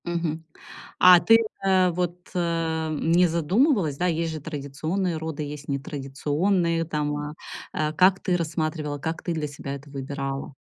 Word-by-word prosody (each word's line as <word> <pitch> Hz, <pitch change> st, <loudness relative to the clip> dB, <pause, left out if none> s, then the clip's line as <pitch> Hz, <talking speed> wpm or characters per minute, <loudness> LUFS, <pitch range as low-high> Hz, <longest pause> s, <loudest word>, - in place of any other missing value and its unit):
Мгм, 170 Hz, -2 st, -2 dB, 0.6 s
а 180 Hz, -1 st, +9 dB
ты, 225 Hz, +6 st, +6 dB, 0.3 s
э, 185 Hz, -1 st, +4 dB
вот, 175 Hz, 0 st, -3 dB
э, 165 Hz, -2 st, -1 dB
не 175 Hz, +2 st, +4 dB
задумывалась, 175 Hz, -, +2 dB
да, 180 Hz, -, +1 dB
есть 165 Hz, -1 st, 0 dB
же 155 Hz, -1 st, -6 dB
традиционные 160 Hz, +4 st, -3 dB
роды, 155 Hz, -1 st, -4 dB
есть 145 Hz, -1 st, -7 dB
нетрадиционные 150 Hz, +5 st, -1 dB
там, 150 Hz, -2 st, -2 dB
а 150 Hz, 0 st, -5 dB, 0.4 s
а 155 Hz, 0 st, -1 dB
как 185 Hz, +4 st, +4 dB
ты 185 Hz, -2 st, 0 dB
рассматривала, 155 Hz, -3 st, -2 dB
как 160 Hz, +3 st, -4 dB
ты 175 Hz, -, -2 dB
для 155 Hz, -2 st, -2 dB
себя 140 Hz, -1 st, -6 dB
это 140 Hz, +1 st, -11 dB
выбирала? 135 Hz, 0 st, -4 dB
160 Hz, 150 wpm, -25 LUFS, 145-175 Hz, 0.6 s, а